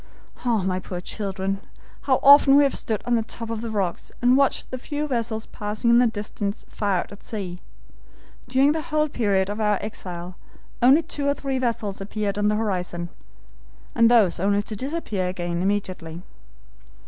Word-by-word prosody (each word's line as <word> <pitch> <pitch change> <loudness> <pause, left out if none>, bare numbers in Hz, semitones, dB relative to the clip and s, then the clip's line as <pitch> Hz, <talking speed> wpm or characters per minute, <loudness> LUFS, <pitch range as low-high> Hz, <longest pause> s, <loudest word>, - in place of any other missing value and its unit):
"Ah, 230 -5 +1
my 185 0 0
poor 180 -1 -6
children! 195 0 -3 0.5
how 260 - +4
often 280 0 +8
we 290 - +7
have 280 - +2
stood 220 -2 -3
on 245 - 0
the 230 - +3
top 230 +1 -6
of 225 -1 -3
the 230 - -4
rocks 195 -5 -2
and 245 +1 +4
watched 275 0 +1
the 255 - -4
few 295 +3 -3
vessels 230 -4 -2
passing 215 +3 -1
in 235 - +6
the 245 - +5
distance 205 -2 -4
far 200 -3 0
out - - -4
at 200 - -12
sea. 185 -5 -5 0.9
During 265 +3 +4
the 315 +1 -1
whole 305 -1 0
period 200 -7 +1
of 205 +2 -4
our 210 -1 +2
exile 180 -4 -7 0.4
only 270 +7 +6
two 285 -2 -3
or 285 - +2
three 270 -2 -2
vessels 225 -6 -2
appeared 205 0 -3
on 205 - +2
the 210 - +2
horizon, 180 -5 -2 0.8
and 230 0 +5
those 215 -8 +4
only 200 +2 +2
to 215 - -6
disappear 240 - -3
again 175 -1 -3
immediately. 185 -4 -2
215 Hz, 180 wpm, -24 LUFS, 195-245 Hz, 0.9 s, often